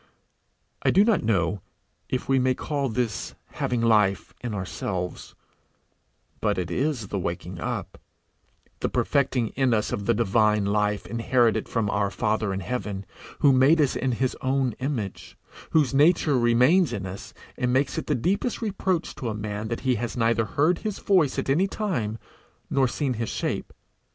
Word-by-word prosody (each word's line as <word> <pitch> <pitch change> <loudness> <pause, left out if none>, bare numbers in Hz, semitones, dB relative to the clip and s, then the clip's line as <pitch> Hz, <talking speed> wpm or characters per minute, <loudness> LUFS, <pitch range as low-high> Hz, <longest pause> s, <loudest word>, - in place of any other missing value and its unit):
I - - +2
do 195 - +5
not 225 -2 +3
know 95 -4 +1 0.5
if 130 - -2
we 135 0 +3
may 130 0 +2
call 140 -1 -2
this 115 -3 -2 0.2
having 120 -2 -1
life 105 -4 +2
in 115 -4 -3
ourselves; 95 -2 -4 1.0
but 105 -3 0
it 90 -2 -3
is 125 - -1
the 100 - -2
waking 90 0 -4
up, 80 - -4 0.8
the - - -1
perfecting 130 -5 +1
in 130 -3 +1
us 105 -1 -1
of 100 0 -3
the 115 - +3
divine 105 -1 +2
life 105 0 0
inherited 115 0 +1
from 115 -3 0
our 100 -1 +1
Father 105 +2 -1
in 95 0 -3
heaven, 100 -1 -4 0.4
who 140 -2 +6
made 135 +6 +5
us 145 -4 +2
in 130 -1 0
his 130 +2 -1
own 130 -1 +1
image, 125 -8 -4 0.3
whose 150 -4 +2
nature 150 +1 +4
remains 125 +6 +4
in 100 -4 -4
us, 95 +1 -7 0.2
and 125 0 0
makes 130 +1 +1
it - - -7
the - - +1
deepest 195 - 0
reproach 190 -5 -1
to 120 - -4
a 110 - -3
man 105 0 -4
that 115 +1 -3
he 130 -1 +2
has 120 +1 -4
neither 115 -1 +2
heard 155 - +1
his 215 -2 -3
voice 180 -9 +2
at - - -2
any 160 +8 +3
time, 160 - -2 0.5
nor 135 -1 +3
seen 135 +1 -1
his 115 - -2
shape. - - -3
120 Hz, 170 wpm, -25 LUFS, 105-140 Hz, 1.0 s, who